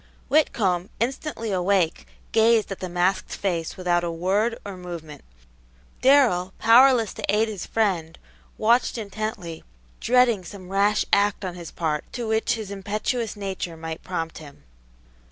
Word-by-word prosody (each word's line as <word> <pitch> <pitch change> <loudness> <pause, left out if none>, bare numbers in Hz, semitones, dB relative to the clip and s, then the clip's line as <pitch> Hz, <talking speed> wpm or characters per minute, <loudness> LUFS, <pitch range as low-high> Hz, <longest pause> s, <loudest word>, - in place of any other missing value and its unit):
Whitcomb, 195 - +2
instantly 235 -1 -2
awake, 185 -2 +1 0.2
gazed 225 -2 +3
at 195 - -5
the 185 - -5
masked 180 +2 0
face 170 -5 -2
without 175 -1 +1
a 170 - -1
word 195 +7 0
or 200 -1 -6
movement. 170 -5 -8 0.8
Darrell, 240 -9 +4
powerless 235 0 +5
to - - -9
aid 215 +2 +3
his 210 -5 -6
friend, 180 -7 0 0.4
watched 235 +3 +2
intently, 205 -6 -5 0.4
dreading 245 -5 +3
some 185 0 -10
rash 200 +2 +2
act 200 0 +2
on 180 - -4
his 175 -2 -8
part 155 -3 -3
to 240 -3 -4
which 220 0 +1
his 215 -3 -6
impetuous 210 +4 -2
nature 190 -4 -5
might 160 0 -6
prompt 165 -3 -4
him. 145 -3 -13
195 Hz, 140 wpm, -24 LUFS, 175-225 Hz, 0.8 s, powerless